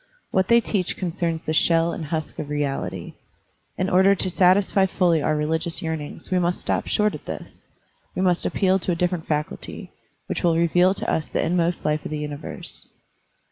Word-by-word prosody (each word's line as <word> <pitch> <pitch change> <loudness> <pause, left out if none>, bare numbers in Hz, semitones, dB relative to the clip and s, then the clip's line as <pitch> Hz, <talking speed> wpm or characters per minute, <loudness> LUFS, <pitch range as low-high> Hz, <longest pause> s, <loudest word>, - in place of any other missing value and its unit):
What 190 0 +2
they 235 0 +5
teach 195 -5 -1
concerns 170 -2 -2
the 155 - -2
shell 165 +1 +3
and 160 - -5
husk 155 0 -4
of 145 - -5
reality. 145 -2 -3 0.6
In 185 - 0
order 190 +2 +5
to 185 -1 0
satisfy 190 +2 +4
fully 175 -3 +2
otir 155 +1 +1
religious 160 +3 -1
yearnings 160 0 -5
we 185 - +3
must 175 0 +1
not - - +2
stop - - -10
short 210 0 +2
at - - -9
this; - - -8 0.5
we - - -1
must 180 -2 +2
appeal 190 -1 +2
to 180 - -1
a - - +1
different 175 -1 -1
faculty, 150 -1 -4 0.3
which - - -3
will 170 -2 +3
reveal 175 +3 +3
to - - -4
us 155 - -1
the - - 0
inmost 175 0 0
life 150 0 0
of - - -5
the 155 - -3
universe. 150 0 -7
170 Hz, 190 wpm, -23 LUFS, 155-185 Hz, 0.6 s, they